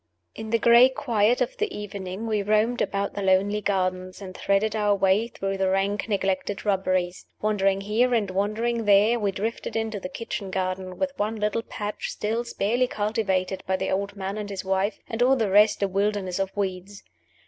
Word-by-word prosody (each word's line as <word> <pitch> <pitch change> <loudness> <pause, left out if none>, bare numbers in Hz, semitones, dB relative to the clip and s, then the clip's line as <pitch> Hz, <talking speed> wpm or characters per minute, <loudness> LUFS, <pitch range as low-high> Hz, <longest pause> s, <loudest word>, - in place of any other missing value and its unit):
In 220 - -7
the 230 - +3
gray 235 +2 +7
quiet 240 -2 +1
of 250 - -1
the 430 -1 -1
evening 200 0 -6
we 215 -2 0
roamed 215 +4 +1
about 200 0 -1
the 205 - -4
lonely 195 +2 +2
gardens, 185 -2 -1
and 185 -2 -9
threaded 210 +2 +1
our 210 -1 +2
way 195 +3 +2
through 195 -4 -4
the 190 -1 +2
rank, 200 +3 0
neglected 195 0 -1
shrubberies. 185 -3 -1
Wandering 195 -2 +1
here 220 +5 +1
and 205 -4 0
wandering 220 +4 -1
there, 210 +4 +5
we 205 -2 0
drifted 215 +4 -4
into 220 -2 -2
the 180 - -6
kitchen 220 -3 -5
garden 185 0 -3
with 280 -1 -1
one 215 +2 0
little 210 +1 -1
patch 210 -2 -5
still 225 +3 -2
sparely 240 +2 0
cultivated 205 -4 -1
by 190 - +1
the - - -2
old 200 +1 -2
man 195 +1 -4
and 205 -1 -5
his 195 -1 -5
wife, 190 +2 0
and 225 +1 -4
all 260 +2 +5
the 220 -6 0
rest 210 +1 +5
a - - +3
wilderness 195 -1 -1
of 195 -1 0
weeds. 195 0 -4
205 Hz, 190 wpm, -25 LUFS, 190-220 Hz, -, gray